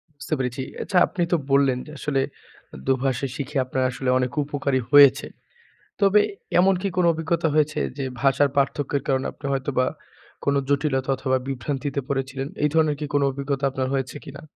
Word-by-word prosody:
বুঝতে 145 - -5
পেরেছি। 125 0 -2 0.2
আচ্ছা 190 - -1
আপনি 180 - -2
তো 175 - +4
বললেন, 135 -2 +4
যে 150 - -11
আসলে 140 -2 0 0.7
দোভাষী 135 0 +1
শিখে 145 +1 -4
আপনার 130 0 -1
আসলে 130 +1 -3
অনেক 125 -1 0
উপকার 140 -1 -3
ই - - -2
হয়েছে। 145 -1 +7 0.7
তবে 200 +1 +5 0.4
এমন 190 +2 +5
কি 200 - 0
কোনো 180 -1 +4
অভিজ্ঞতা 160 +1 0
হয়েছে 155 0 +2 0.2
যে 140 - -2 0.2
ভাষার 140 +1 +3
পার্থক্যের 140 0 0
কারণে 135 0 +1
আপনি - - -12
হয়তোবা 135 -1 0 0.6
কোনো 140 0 +2
জটিলতা 135 -2 0
অথবা 130 0 0
বিভ্রান্তিতে 135 +2 -3
পড়েছিলেন। 135 -1 -3 0.2
এই 150 - +4
ধরনের 155 -2 +3
কি 150 - -3
কোনো 145 0 +3
অভিজ্ঞতা 140 0 -3
আপনার 130 0 -2
হয়েছে 135 -1 -2
কিনা? 140 0 -9
140 Hz, 170 wpm, -23 LUFS, 135-150 Hz, 0.7 s, হয়েছে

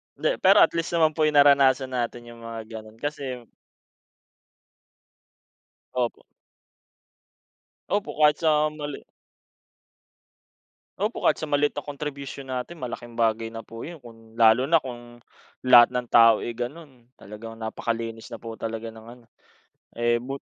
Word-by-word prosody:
Hindi, - - -1
pero - - +7
at - - +3
least 165 0 -2
naman 160 -2 +4
po, 155 -1 +2
yung 150 - -1
naranasan 140 -2 +5
natin 120 -1 -3
yung 115 - -14
mga 115 -1 -7 0.2
ganun, 110 +1 -15
kasi 135 -5 -5 2.5
Opo. 125 -2 -2 1.6
Opo, 205 0 -1
kahit 150 0 +5
sa 155 -1 +3
mali. 150 -2 -6 2.0
Opo, - - -2
kahit - - +3
sa - - -4
maliit 145 -1 0
na - - -4
contribution 140 -2 -7
natin, 130 +6 -5
malaking 120 -1 -6
bagay 115 -1 0
na 115 - -6
po 115 0 -9
yun 170 -2 -10
kung 115 -2 -16
lalo 115 +2 +5
na 160 +2 +3
kung 120 -2 -10 0.4
lahat 125 -1 +7
ng 125 -1 -2
tao, 115 -2 +6
eh, - - -4
ganun, 130 0 -7
talagang 105 +3 -10
napakalinis 115 +1 -5
na 115 - -8
po 115 -1 -8
talaga 115 0 -5
ng 110 0 -13
ano, 120 +1 -13 0.7
eh, 120 0 0
but 135 +2 -5
125 Hz, 140 wpm, -25 LUFS, 115-145 Hz, 2.5 s, pero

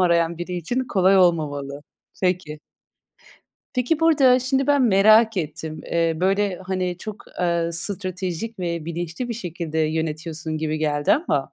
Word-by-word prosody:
arayan 170 -2 +2
biri 175 +1 -5
için 240 +10 -2
kolay 195 -4 +3
olmamalı. 145 -5 +1 0.4
Peki. 180 -4 -1 1.2
Peki 255 +5 0
burada 280 -6 +5
şimdi 265 +1 0
ben 285 -2 +3
merak 215 0 +5
ettim. 155 -1 -4
Eee, 165 -1 +1
böyle 195 0 +1
hani 185 -2 -2
çok, 215 +1 -8 0.2
ııı, 170 -1 0
stratejik 185 +3 -4
ve 170 -3 -3
bilinçli 170 +8 -4
bir 235 - -3
şekilde 170 -6 -5
yönetiyorsun 155 0 -2
gibi 155 0 -2
geldi 145 -1 +1
ama 320 +5 0
175 Hz, 135 wpm, -23 LUFS, 160-210 Hz, 1.2 s, burada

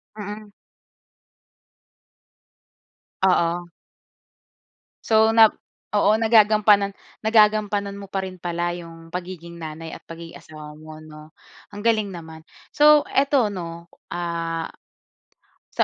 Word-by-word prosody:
Mm. 210 0 -8 2.7
Oo. 175 -1 +1 1.4
So, 220 0 +4
nap 225 -1 +7 0.4
oo, 205 0 +4
nagagampanan 215 -2 +4 0.3
nagagampanan 210 -2 +2
mo 200 -1 -10
pa 195 - -1
rin 185 -1 -8
pala 175 0 -2
yung 165 -1 -11
pagiging 175 -1 -7
nanay 160 0 -8
at - - -14
pagiging 165 0 -10
asawa 150 -1 -11
mo 155 0 -11
'no, 155 0 -13 0.4
ang 205 - -7
galing 215 -3 +2
naman. 160 -2 -10 0.3
So 300 0 +6
eto 275 -4 +2
'no, 170 -3 -7 0.2
ah, 165 -1 -3 1.0
sa - - +1
180 Hz, 100 wpm, -23 LUFS, 165-210 Hz, 2.7 s, nap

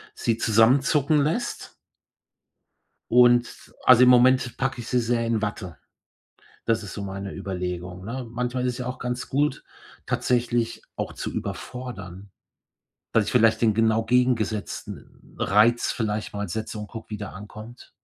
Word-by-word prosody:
sie 115 -1 0
zusammenzucken 135 +7 +3
lässt. 165 +12 -2 1.4
Und 120 0 +3
also, 125 0 +7
im 125 - +7
Moment 125 -1 +4
packe 135 -2 -2
ich 120 - -7
sie 125 - +1
sehr 115 0 0
in 115 -2 0
Watte. 95 -6 -4 0.9
Das 110 -2 0
ist 95 - -8
so 100 - -5
meine 100 0 -5
Überlegung, 90 -1 -5
ne? 125 +3 -5
Manchmal 125 +1 -2
ist 125 -1 0
es - - -8
ja 125 - -4
auch 125 0 -5
ganz 125 0 -4
gut, 145 0 0 0.4
tatsächlich 120 -1 0
auch - - -4
zu - - -5
überfordern, 100 -7 -7 0.8
dass 110 -3 +3
ich - - -3
vielleicht 115 -2 +4
den 110 -3 +3
genau 115 0 +2
gegengesetzten 115 -3 -2
Reiz 110 +4 +3
vielleicht 105 -2 -3
mal 105 0 -4
setze 110 -1 -4
und 105 - -6
gucke, 115 -2 -10
wie 105 - -3
der 105 -1 -7
ankommt. 105 +4 -11
115 Hz, 150 wpm, -25 LUFS, 105-125 Hz, 1.4 s, also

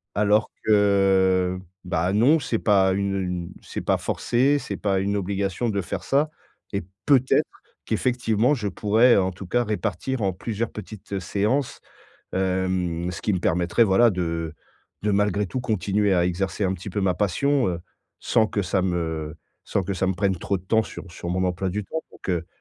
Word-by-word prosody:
Alors 105 +1 +3 0.2
que, 95 -3 +3 0.2
bah, 90 0 0
non, 130 +10 +5
c'est 120 -5 -1
pas 95 -3 +4
une 100 0 -1
une 90 -2 -4
c'est - - -6
pas - - +1
forcé, 135 +4 +1
c'est - - -5
pas 100 -2 0
une 100 +2 0
obligation 100 +3 -1
de 100 -2 -1
faire 85 - -5
ça 145 +3 +2 0.4
et 100 - 0 0.2
peut-être, 130 -3 +4 0.4
qu'effectivement, 120 0 +1
je 115 -7 -2
pourrais, 110 +5 +4
en 95 -1 +2
tout 90 +1 -10
cas, 120 +5 +1
répartir 110 +4 -2
en 100 -2 +1
plusieurs 110 +4 -3
petites 100 -1 -6
séances, 105 +9 -1 0.5
hem, 90 -2 -1
ce 85 - -7
qui 105 - +1
me 95 - +1
permettrait, 90 +6 +2
voilà 115 +4 +5
de 85 -3 -2 0.5
de 105 - +1
malgré 105 0 +1
tout, 130 +7 -3
continuer 105 -3 +1
à 90 -1 +3
exercer 95 +3 -1
un 95 - +1
petit 95 +3 -7
peu 100 - -2
ma 95 -2 +2
passion, 125 +7 +1
heu, 85 -1 -3 0.4
sans 110 -2 +3
que 100 - -1
ça 95 +1 0
me 80 -4 -2 0.3
sans 100 - -1
que 100 +2 -2
ça 95 +1 0
me 95 - 0
prenne 95 +1 +1
trop 95 +3 -1
de - - -17
temps 110 +3 +3
sur 100 - -9
sur 85 - -7
mon 90 +1 0
emploi 90 +1 -1
du 105 +3 -3
temps. 160 +10 -4
Donc, - - -13
heu, 85 -2 -1
100 Hz, 185 wpm, -24 LUFS, 90-110 Hz, 0.5 s, non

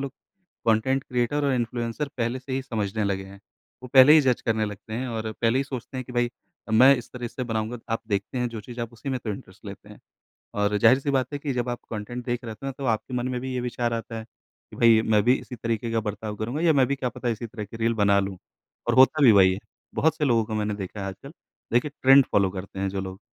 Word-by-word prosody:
लोग 135 - -4 0.6
content 130 +5 +2
creator 125 +4 0
और 140 - +2
influencer 120 +3 -2
पहले 120 +2 -1
से 130 +1 -8
ही 135 0 -1
समझने 110 -4 -2
लगे 95 -1 -1
हैं। 100 +1 -13 0.4
वो 125 - -8
पहले 130 +3 +9
ही 155 - +8
जज 130 -3 +1
करने 110 -2 +1
लगते 105 +1 -8
हैं, 125 +2 -3
और 110 -1 -3
पहले 115 +2 +3
ही 140 - 0
सोचते 130 -1 -7
हैं 130 - -4
कि, 125 - -10
"भई 120 0 +1 0.4
अ, - - -7
मैं 130 +5 +8
इस 120 0 -8
तरह 120 -2 -5
से 125 - -5
बनाऊँगा।" 115 +1 -3 0.2
आप - - -4
देखते 100 +5 -2
हैं 125 0 0
जो 115 -2 -7
चीज़ 120 +3 -8
आप 115 0 -4
उसी 120 +4 -8
में 130 -1 -1
तो 110 - -4
इंटरेस्ट 100 - -9
लेते - - -10
हैं। - - -14 0.6
और 105 0 +1
ज़ाहिर-सी 130 +7 +4
बात 130 +1 0
है 145 - -3
कि 140 -2 -3
जब 120 0 -1
आप 120 - -3
कंटेंट 120 +3 -5
देख 120 -1 -2
रहे 110 -1 -6
थे 135 - -8
न - - -3
तो 135 - -5
आपके 115 +2 -1
मन 125 0 -1
में 125 -1 -2
भी 130 0 -4
ये 125 - -1
विचार 120 -1 -2
आता 115 0 -4
है - - -7 0.5
कि - - -10
भई, 115 -1 +5
मैं 110 -2 +3
भी 125 +2 +5
इसी 125 - -9
तरीके 115 0 -2
का 115 - +1
बर्ताव 105 0 -4
करूँगा, 120 +9 -3
या 165 -2 +4
मैं 135 -2 +4
भी 140 - 0
क्या 130 -2 -2
पता 120 +1 -4
इसी 115 +1 -3
तरह 105 -1 -7
की 115 +3 -10
रील 115 +1 +1
बना 100 -2 +3
लूँ। 95 -1 -3 0.5
और 120 - +2
होता 135 +4 +6
भी 120 - +9
वही 95 -2 +6
है, 95 - -5 0.4
बहुत 160 +1 +2
से 150 - +1
लोगों 115 -4 +3
को 110 - -4
मैंने 105 -1 -1
देखा 100 +1 -7
है - - -3
आजकल। 135 - -9 0.4
देखिए 130 +4 +2
ट्रेंड 135 0 +7
फॉलो 100 -2 +3
करते 95 0 -7
हैं 100 0 0
जो 95 0 -3
लोग, 95 +1 -7
120 Hz, 270 wpm, -25 LUFS, 110-130 Hz, 0.6 s, पहले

